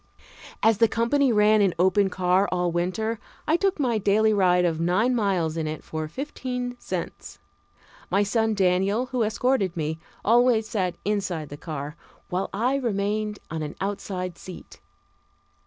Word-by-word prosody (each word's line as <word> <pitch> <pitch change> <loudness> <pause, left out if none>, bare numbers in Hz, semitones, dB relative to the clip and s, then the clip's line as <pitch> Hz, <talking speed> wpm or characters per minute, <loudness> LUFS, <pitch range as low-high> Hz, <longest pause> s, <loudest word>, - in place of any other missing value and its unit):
As 220 -1 +4
the 230 - +6
company 245 +5 +2
ran 210 0 +4
an 195 -3 +2
open 190 +3 +3
car 185 +1 +2
all 180 -1 0
winter, 195 +6 -1 0.3
I 315 - +4
took 390 -1 +1
my 240 -6 +1
daily 215 +2 +3
ride 180 -3 +3
of 165 -2 0
nine 185 +9 +2
miles 185 -8 0
in 160 -1 -1
it 155 0 -5
for 155 -1 -4
fifteen 250 - -4
cents. - - -6 0.7
My 200 - +3
son 220 +1 +1
Daniel, 195 +5 +2
who 250 -2 0
escorted 215 -4 +1
me, 160 0 -2 0.3
always 235 0 +4
sat 185 -6 -1
inside 190 -7 -2
the 145 - -7
car, 150 -1 -6 0.3
while 185 +2 -2
I 245 +7 +1
remained 210 -3 -1
on 160 -1 -3
an 150 -1 -5
outside 185 -3 -4
seat. 185 -2 -11
200 Hz, 155 wpm, -25 LUFS, 180-225 Hz, 0.7 s, the